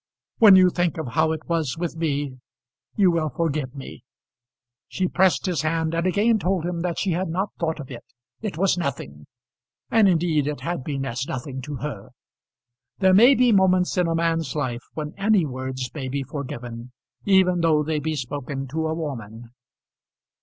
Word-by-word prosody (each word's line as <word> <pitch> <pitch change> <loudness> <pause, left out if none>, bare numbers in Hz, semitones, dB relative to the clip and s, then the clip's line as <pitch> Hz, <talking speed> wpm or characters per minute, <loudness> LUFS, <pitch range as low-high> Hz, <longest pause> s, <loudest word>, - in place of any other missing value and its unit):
"When 210 -5 +9
you 185 -1 +6
think 175 -2 0
of 160 -6 -4
how 160 +7 +2
it 160 -1 -5
was 160 -6 -1
with 170 -1 -3
me, 145 -5 -2 0.6
you 190 -4 +4
will 160 -2 0
forgive 145 -2 -2
me." 135 - -9 0.9
She 185 - -1
pressed 185 +1 +2
his 180 -6 0
hand 160 +1 -1
and 170 +2 0
again 215 +4 +2
told 180 -2 0
him 175 -1 -3
that 175 -1 -2
she 195 - 0
had 180 +3 -1
not 190 +5 -2
thought 160 -2 -1
of 135 -2 -8
it. 120 - -8 0.4
It 210 -7 -4
was 185 0 +2
nothing. 75 - -5 0.6
And 220 -3 +5
indeed 160 -4 +1
it 150 -1 -4
had 175 -6 -3
been 135 -1 -3
as 130 +1 -3
nothing 130 -3 -5
to 145 +3 -6
her. 135 -7 -6 0.9
There 190 -1 +4
may 240 +8 +7
be 250 -1 +4
moments 185 -3 +3
in 180 -2 +2
a 165 - 0
man's 165 -4 0
life 125 -5 -2
when 150 -1 -5
any 200 -3 +3
words 130 -2 -5
may 140 -4 -5
be 135 +1 -2
forgiven, 125 -3 -7 0.3
even 190 -2 +4
though 155 -2 +3
they 155 0 -1
be 155 +1 -2
spoken 135 0 -5
to 160 +3 -2
a 160 - -2
woman. 120 -7 -6
160 Hz, 180 wpm, -23 LUFS, 135-180 Hz, 0.9 s, When